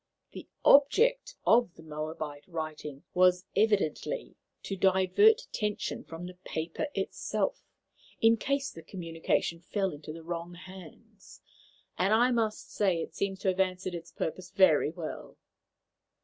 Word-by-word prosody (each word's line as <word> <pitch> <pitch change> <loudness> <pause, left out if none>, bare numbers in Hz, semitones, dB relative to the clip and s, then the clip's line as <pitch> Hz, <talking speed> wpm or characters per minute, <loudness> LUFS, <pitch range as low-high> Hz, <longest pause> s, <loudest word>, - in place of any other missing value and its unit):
The - - -10 0.2
object - - +5
of 230 -5 +4
the 160 - -14
Moabite 155 -1 -6
writing 155 -4 -6
was 180 0 +4
evidently 210 - 0 0.3
to 195 - -3
divert 190 - +4
attention 210 -2 -3
from 165 +2 -8
the 180 0 -10
paper 160 - -3
itself, - - -2 0.6
in 225 0 +5
case 275 +3 -1
the 165 - -10
communication 165 -1 -2
fell 195 +2 -1
into 150 0 -8
the 165 +1 -9
wrong 170 +1 -5
hands, 185 -2 -13 0.6
and 195 +4 +4
I 245 +3 +4
must 225 -3 -1
say 190 -5 +1
it - - -9
seems 195 -1 -2
to 190 - +2
have 185 0 -1
answered 185 -1 0
its 170 -1 -7
purpose 180 +3 -4
very 185 -7 +4
well." 165 -1 -7
185 Hz, 135 wpm, -30 LUFS, 165-210 Hz, 0.6 s, object